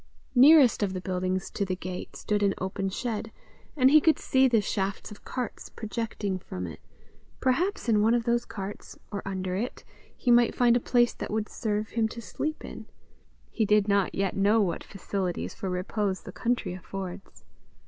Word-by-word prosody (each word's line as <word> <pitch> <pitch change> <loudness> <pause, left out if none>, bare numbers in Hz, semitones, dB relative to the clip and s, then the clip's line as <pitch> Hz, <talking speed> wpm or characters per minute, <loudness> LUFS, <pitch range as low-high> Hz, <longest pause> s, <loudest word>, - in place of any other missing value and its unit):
Nearest 270 -1 +7
of 195 -2 0
the 185 - -3
buildings 185 0 -2
to - - -1
the 185 -1 -1
gate, 185 0 -7
stood 210 -1 -1
an 200 -1 +2
open 190 +1 -2
shed, 220 +1 -3 0.5
and 260 -1 +6
he 310 +1 +8
could 320 +1 +4
see 265 0 +3
the 235 -3 +4
shafts 200 0 -2
of 210 - -12
carts 250 -4 -5
projecting 215 -3 -3
from 90 - -6
it: 80 -4 -8 0.6
perhaps 330 - 0
in 215 -3 +4
one 225 +3 +4
of 240 - +1
those 235 +1 +1
carts, 200 0 -7
or 200 - -3
under 185 -1 -2
it, 230 +6 -4 0.3
he 245 - +1
might 240 0 +5
find 240 -1 +4
a - - +4
place 240 0 +2
that - - -6
would 215 0 -1
serve 215 -1 -2
him 225 -1 +1
to 235 - -8
sleep 305 +7 -4
in: - - -9 0.6
he 225 - 0
did 210 -1 +3
not 200 -2 +2
yet 195 -1 0
know 205 +3 +4
what 180 -6 0
facilities 190 -2 -3
for 190 - -5
repose 190 +2 -1
the - - -9
country 235 -3 -1
affords. 190 +1 -8
210 Hz, 185 wpm, -28 LUFS, 190-235 Hz, 0.6 s, he